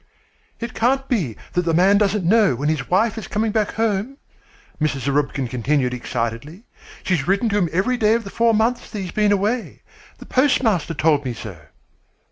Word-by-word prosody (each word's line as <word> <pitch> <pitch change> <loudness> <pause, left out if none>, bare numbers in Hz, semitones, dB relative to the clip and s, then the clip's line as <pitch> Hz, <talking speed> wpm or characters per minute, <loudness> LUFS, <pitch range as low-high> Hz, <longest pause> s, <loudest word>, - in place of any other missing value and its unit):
"It 235 -1 -5
can't 265 +3 +1
be 175 - -1 0.2
that 180 - +2
the 165 -2 0
man 195 +4 +4
doesn't 205 -2 +1
know 205 - +4
when 145 +5 -1
his 155 -3 -2
wife 220 +5 +2
is - - -8
coming 220 +1 -1
back 215 -1 0
home," 225 +4 -1 0.6
Mrs. 150 -3 0
Zarubkin 140 0 -1
continued 125 +2 0
excitedly. 125 - -4 0.4
"She's 175 -7 0
written 200 +5 +2
to 205 - 0
him 175 -4 +1
every 235 +8 0
day 220 -1 +3
of 230 - -2
the 200 - -9
four 230 -1 +2
months 230 +3 0
that 210 - -6
she's 185 -3 -5
been 210 -1 +2
away. 210 +4 -1 0.3
The - - -12
postmaster 225 - +1
told 150 -3 +2
me 125 -3 -4
so." 110 -4 -8
195 Hz, 185 wpm, -21 LUFS, 150-225 Hz, 0.6 s, man